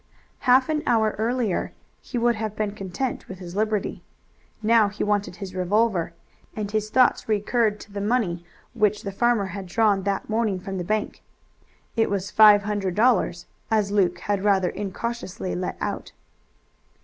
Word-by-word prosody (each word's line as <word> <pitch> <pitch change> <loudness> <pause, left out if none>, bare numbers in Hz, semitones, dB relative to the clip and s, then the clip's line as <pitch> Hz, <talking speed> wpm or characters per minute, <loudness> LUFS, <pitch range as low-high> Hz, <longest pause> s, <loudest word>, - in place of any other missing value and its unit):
Half 255 +1 +6
an 305 -1 0
hour 220 -2 +3
earlier 230 -3 -1 0.3
he 250 - -5
would 240 0 +3
have 215 -1 -4
been 215 -1 -1
content 205 +5 -4
with 190 - -8
his 180 -1 -9
liberty. 215 0 -1 0.6
Now 220 -1 +4
he 210 - -4
wanted 205 -3 0
his 195 -2 -7
revolver, 185 -1 +1 0.4
and 210 -2 -4
his 215 0 -1
thoughts 250 -1 +3
recurred 215 0 +1
to 205 - -13
the 200 0 -4
money 205 -6 0 0.3
which 210 -3 +1
the 200 - -4
farmer 235 0 +2
had 190 +1 -6
drawn 205 +1 +2
that 195 0 -2
morning 220 -3 0
from 190 +1 -5
the - - -2
bank. 215 +3 -2 0.7
It 225 - +2
was 200 -1 -2
five 210 -1 +7
hundred 200 -3 -2
dollars, 210 -6 +2 0.2
as 210 -3 +1
Luke 185 -4 +2
had 200 -1 -1
rather 195 -3 +3
incautiously 195 - -4
let 90 - -3
out. - - -4
210 Hz, 160 wpm, -24 LUFS, 195-220 Hz, 0.7 s, five